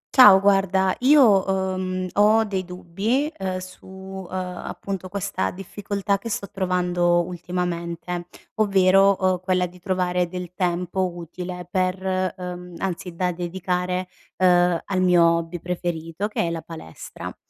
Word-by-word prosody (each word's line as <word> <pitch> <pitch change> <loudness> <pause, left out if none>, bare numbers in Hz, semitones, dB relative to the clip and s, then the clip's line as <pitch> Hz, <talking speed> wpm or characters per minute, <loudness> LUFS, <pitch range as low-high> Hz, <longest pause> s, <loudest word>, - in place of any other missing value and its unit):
Ciao 205 -7 +9
guarda 195 -1 +2
io, 250 -8 +6
uhm, 185 -1 -1
ho 215 +2 +5
dei 195 -3 -2
dubbi, 205 - -2
uhm, 185 -1 -2
su, 185 0 -10
uhm, 190 0 -9
appunto 185 +1 -5
questa 195 - -2
difficoltà 200 +1 -3
che 230 - -6
sto 200 -2 -4
trovando 180 -2 +1
ultimamente. 175 0 -4 0.3
Ovvero, 195 -1 +4
uhm, 185 -1 +2
quella 185 -1 +1
di 180 +1 -11
trovare 180 -1 0
del 180 0 -7
tempo 180 0 -1
utile 180 +1 -7
per 185 -1 +1 0.4
uhm, 180 -1 -7
anzi 180 -2 -4
da 180 +1 0
dedicare, 180 +1 -2 0.3
uhm, 175 -2 +4
al 190 -2 -1
mio 180 -2 +5
hobby 170 +1 +1
preferito 175 +1 -3
che 215 - -2
è 170 - 0
la 165 -1 -4
palestra. 160 - -9
185 Hz, 135 wpm, -23 LUFS, 175-195 Hz, 0.4 s, Ciao